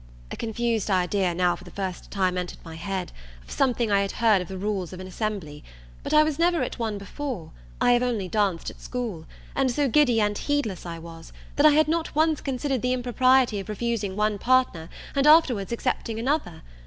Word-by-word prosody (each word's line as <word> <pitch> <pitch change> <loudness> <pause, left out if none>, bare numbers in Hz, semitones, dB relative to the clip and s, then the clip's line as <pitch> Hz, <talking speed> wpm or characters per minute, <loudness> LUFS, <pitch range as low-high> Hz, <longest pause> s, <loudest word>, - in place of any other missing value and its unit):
A - - -4
confused 230 -1 -1
idea 185 -1 +1
now 180 0 +2
for - - -13
the 180 - -11
first 190 -2 -5
time 185 -3 0
entered 180 -1 -4
my 165 - -8
head, 185 +2 -4 0.3
of - - -15
something 245 -4 +1
I 200 0 +4
had 200 - -2
heard 220 -4 +3
of 180 - -6
the 190 - -6
rules 190 -2 -3
of 185 - -8
an 185 - -7
assembly; 185 -6 -4 0.4
but - - -5
I 305 0 +6
was 310 -1 -2
never 345 -1 +3
at - - -5
one 220 -3 -2
before, 205 - -6 0.3
I 245 - +4
have 240 0 +4
only 235 -6 -1
danced 195 -4 0
at - - -18
school, 225 -11 -5 0.3
and 270 -1 +2
so 280 +3 +1
giddy 255 -3 +4
and 210 -1 +1
heedless 225 -10 -2
I 165 -1 -5
was, 165 0 -11 0.2
that 290 +2 +6
I 300 - +6
had 310 +1 +4
not 325 -1 -1
once 315 0 +2
considered 270 -1 -2
the 250 0 +1
impropriety 255 -2 +3
of 195 - -8
refusing 210 -2 -2
one 210 0 0
partner, 250 -11 +2 0.2
and 275 +1 +2
afterwards 265 - +5
accepting 230 -1 -2
another. 240 - -2
220 Hz, 205 wpm, -25 LUFS, 185-255 Hz, 0.4 s, I